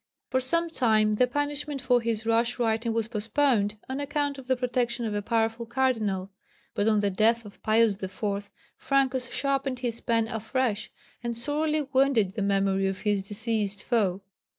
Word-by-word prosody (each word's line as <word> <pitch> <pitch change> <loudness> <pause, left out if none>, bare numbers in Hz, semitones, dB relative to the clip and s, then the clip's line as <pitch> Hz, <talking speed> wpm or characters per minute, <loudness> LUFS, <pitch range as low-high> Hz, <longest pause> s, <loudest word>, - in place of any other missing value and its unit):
For 260 - +3
some 335 +6 0
time 215 -6 +3
the 250 +4 +3
punishment 290 +1 -2
for 250 -2 +2
his 225 -1 -2
rash 230 +1 +2
writing 230 -1 0
was 225 -1 -1
postponed, 220 -1 +1
on 265 +1 -3
account 285 -1 -1
of 255 - -12
the 260 - +3
protection 245 -1 -1
of 215 - -2
a 205 - -1
powerful 225 +1 0
Cardinal; 220 -7 0 0.4
but 205 - 0
on 215 -2 +3
the 200 -1 +1
death 225 +4 +2
of 200 - -13
Pius 220 -2 +3
IV. 200 +1 -3 0.3
Francus 260 -2 +1
sharpened 275 -1 0
his 235 -2 -3
pen 230 -1 +1
afresh, 225 0 -1 0.3
and 235 -1 -3
sorely 300 +4 0
wounded 265 -8 +2
the 215 - -3
memory 195 -1 +2
of 195 -1 -3
his 205 -2 0
deceased 210 -1 -2
foe. 200 -6 +1
230 Hz, 170 wpm, -27 LUFS, 210-260 Hz, 0.4 s, For